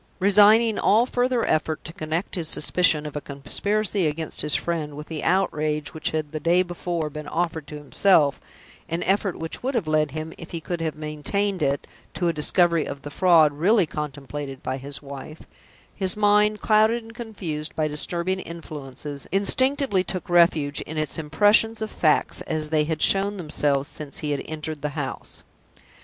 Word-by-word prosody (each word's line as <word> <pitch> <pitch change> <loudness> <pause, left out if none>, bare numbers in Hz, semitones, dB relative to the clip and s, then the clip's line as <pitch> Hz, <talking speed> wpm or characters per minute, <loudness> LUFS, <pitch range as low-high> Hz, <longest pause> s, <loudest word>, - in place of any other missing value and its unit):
Resigning 210 +3 +5
all 225 +4 +4
further 250 -1 0
effort 155 0 0
to 165 - -7
connect 160 +4 -3
his 170 -5 -2
suspicion 155 -1 +3
of 150 - -7
a 150 - -3
conspiracy 195 +7 -1
against 155 +1 -2
his 150 -1 +3
friend 155 -4 -2
with 150 - -7
the 160 -2 -4
outrage 155 -5 0
which 160 - -2
had 155 -2 -3
the 155 - -4
day 175 +3 +3
before 175 -2 -3
been 150 0 -7
offered 160 -2 -2
to 150 - -7
himself 150 0 +3 0.5
an 165 +1 -2
effort 195 0 0
which 165 0 -5
would 265 +2 -2
have 225 - 0
led 155 -1 +2
him, 155 +3 -6
if 165 - -9
he 170 - -5
could 170 +1 -4
have 160 -2 -2
maintained 155 +6 -2
it, 140 -1 0 0.3
to 175 - 0
a 170 - +1
discovery 170 +1 +2
of 140 0 -7
the 145 - -7
fraud 165 -3 +5
really 185 +6 +3
contemplated 145 -2 -6
by 130 - -2
his 140 +2 -5
wife 140 +3 -9 0.5
his 190 -1 -1
mind, 210 0 +3
clouded 220 +2 +3
and 225 0 -13
confused 185 -10 -5
by 155 -1 +1
disturbing 170 +5 -1
influences, 150 -4 -8
instinctively 210 +2 +2
took 185 -2 -5
refuge 160 -5 +3
in 160 - -7
its 155 +1 -2
impressions 210 +8 +3
of 220 -1 -4
facts 155 -3 +1
as 155 -1 -2
they 155 -1 +2
had 160 0 -1
shown 200 +1 +3
themselves 145 -4 0
since 150 -2 -5
he 150 - -2
had 145 - -1
entered 155 -1 -5
the 150 - -2
house. 135 -3 -5
160 Hz, 175 wpm, -24 LUFS, 150-195 Hz, 0.5 s, Resigning